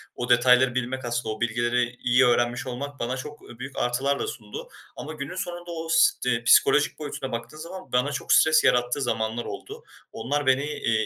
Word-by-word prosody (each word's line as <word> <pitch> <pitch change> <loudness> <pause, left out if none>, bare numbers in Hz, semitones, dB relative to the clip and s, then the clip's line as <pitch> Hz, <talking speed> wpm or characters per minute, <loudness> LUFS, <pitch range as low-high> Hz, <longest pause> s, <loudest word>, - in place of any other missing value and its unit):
O 125 - -4
detayları 125 +1 +5
bilmek 125 +1 -3
aslında 120 -2 -2
o - - -15
bilgileri 120 +1 0
iyi 125 +2 +4
öğrenmiş 120 +1 +1
olmak 140 +3 -6
bana 125 +2 -2
çok, 150 +3 -8
ııı, 120 - -14
büyük 135 +1 -8
artılar 135 +3 0
da - - -2
sundu 105 -2 -8 0.3
ama 155 +2 -7
günün 150 +4 -6
sonunda 175 -2 -5
o 165 -1 -5
s 125 -7 +3
psikolojik 145 +6 +4
boyutuna 140 -3 -5
baktığım 120 +6 -6
zaman, 185 +3 -9
bana 125 +4 +1
çok 130 - 0
stres 155 0 +5
yarattığı 125 +1 +2
zamanlar 115 -1 -2
oldu. - - -8 0.3
Onlar 140 +6 -2
beni, 130 +1 +3
eee, 115 -7 -1
125 Hz, 185 wpm, -25 LUFS, 120-145 Hz, 0.3 s, detayları